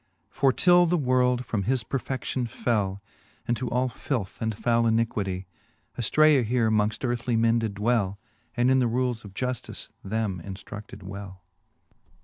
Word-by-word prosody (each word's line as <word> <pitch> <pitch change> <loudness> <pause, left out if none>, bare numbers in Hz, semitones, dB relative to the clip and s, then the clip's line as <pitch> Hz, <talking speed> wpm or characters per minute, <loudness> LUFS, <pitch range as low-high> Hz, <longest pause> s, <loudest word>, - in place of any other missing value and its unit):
For 135 - +3
till 175 +5 +5
the 175 +1 +2
world 125 -3 +2
from 105 -4 -2
his 130 0 +1
perfedion 130 0 -3
fell 105 -5 -1 0.4
Into 120 +1 -1
all 125 +2 +1
filth 120 -4 -4
and 110 0 0
foule 115 +2 +2
iniquitie, 105 -5 0 0.5
Afircea 145 +3 +4
here 115 -1 +1
mongft 105 +4 +1
earthly 120 0 -1
men 115 +1 +3
did 110 -3 -3
dwell, 105 -2 +1 0.4
And 120 +2 +3
in 130 - +4
the 125 - +3
rules 120 0 -1
of 100 -2 -12
juftice 125 +2 -4
them 100 -3 -2
inftruded 100 +1 -9
well. 95 -1 -8
115 Hz, 145 wpm, -26 LUFS, 105-125 Hz, 0.5 s, till